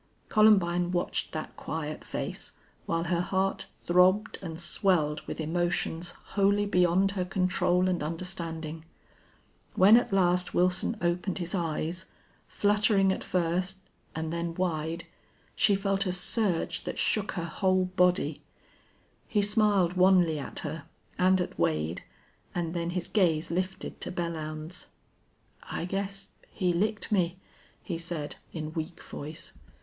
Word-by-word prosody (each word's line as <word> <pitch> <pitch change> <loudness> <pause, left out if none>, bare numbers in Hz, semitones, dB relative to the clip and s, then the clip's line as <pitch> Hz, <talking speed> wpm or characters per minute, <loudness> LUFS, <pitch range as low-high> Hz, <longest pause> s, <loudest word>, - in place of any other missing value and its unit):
Columbine 180 -5 +4
watched 175 -1 -1
that 155 - -5
quiet 155 -1 -5
face, - - -5 0.3
while 165 0 0
her 175 0 +1
heart 190 +1 0 0.2
throbbed 185 +4 +4
and 165 -3 -6
swelled 170 -4 +1
with - - -5
emotions 175 +1 -1 0.2
wholly 200 +1 +3
beyond 185 0 +3
her 190 -2 -1
control 180 0 +1
and 180 -2 0
understanding. 165 -1 -4 0.9
When 200 +4 +8
at 245 - +1
last 180 -2 +2
Wilson 185 +5 +2
opened 175 +2 0
his 175 -2 -3
eyes, 170 0 -2 0.4
fluttering 205 -1 +3
at - - -3
first, 180 +2 0 0.4
and 160 0 -3
then 170 0 -2
wide, 165 -2 -2 0.5
she 205 - +4
felt 195 0 0
a - - +1
surge 185 0 0
that - - -4
shook 210 -2 +1
her 170 -3 -3
whole 185 +2 +1
body. 180 0 +1 0.9
He 210 -2 +2
smiled 205 -4 +3
wanly 180 -4 +4
at 140 - -5
her, 165 - -5 0.3
and 185 +1 +4
at 180 - -3
Wade, 80 +2 0 0.5
and 170 -2 -1
then 170 -1 -2
his 175 0 -2
gaze 170 -6 +2
lifted 185 +2 -3
to - - -3
Belllounds. 165 -1 -4 0.7
"I - - -4
guess 195 +1 -3 0.2
he 180 -2 0
licked 210 +6 -1
me," 180 -3 +2 0.5
he 170 -3 -4
said, 165 -3 -4
in 155 -1 -5
weak 165 +1 -5
voice. 155 +3 -6
180 Hz, 135 wpm, -29 LUFS, 165-190 Hz, 0.9 s, When